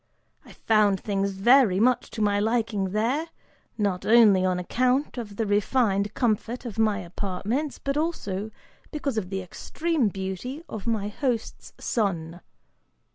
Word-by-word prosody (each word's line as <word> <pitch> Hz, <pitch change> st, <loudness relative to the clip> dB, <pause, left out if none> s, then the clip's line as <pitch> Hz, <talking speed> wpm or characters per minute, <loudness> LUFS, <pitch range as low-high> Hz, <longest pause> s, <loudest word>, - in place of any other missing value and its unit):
I -, -, -15 dB
found 210 Hz, -3 st, +2 dB
things 200 Hz, 0 st, -1 dB
very 210 Hz, 0 st, +4 dB
much 250 Hz, +3 st, +2 dB
to 220 Hz, -, -3 dB
my 205 Hz, -1 st, +2 dB
liking 220 Hz, -2 st, 0 dB
there, 230 Hz, -, 0 dB, 0.5 s
not 200 Hz, -4 st, -1 dB
only 215 Hz, -5 st, +6 dB
on 185 Hz, -1 st, +1 dB
account 255 Hz, +8 st, 0 dB
of 210 Hz, -4 st, -7 dB
the 225 Hz, -, -1 dB
refined 205 Hz, -1 st, +1 dB
comfort 240 Hz, +1 st, -1 dB
of 225 Hz, -2 st, -6 dB
my 215 Hz, -2 st, +3 dB
apartments, 200 Hz, -, -3 dB
but 275 Hz, +1 st, -2 dB
also 220 Hz, -, -2 dB, 0.4 s
because 280 Hz, -7 st, -2 dB
of 185 Hz, -4 st, -7 dB
the 190 Hz, -1 st, -3 dB
extreme 310 Hz, -, -1 dB
beauty 195 Hz, -, -5 dB
of 220 Hz, 0 st, -7 dB
my 210 Hz, -3 st, 0 dB
host's 235 Hz, 0 st, -3 dB
son. 175 Hz, -6 st, -2 dB
215 Hz, 140 wpm, -26 LUFS, 195-245 Hz, 0.5 s, only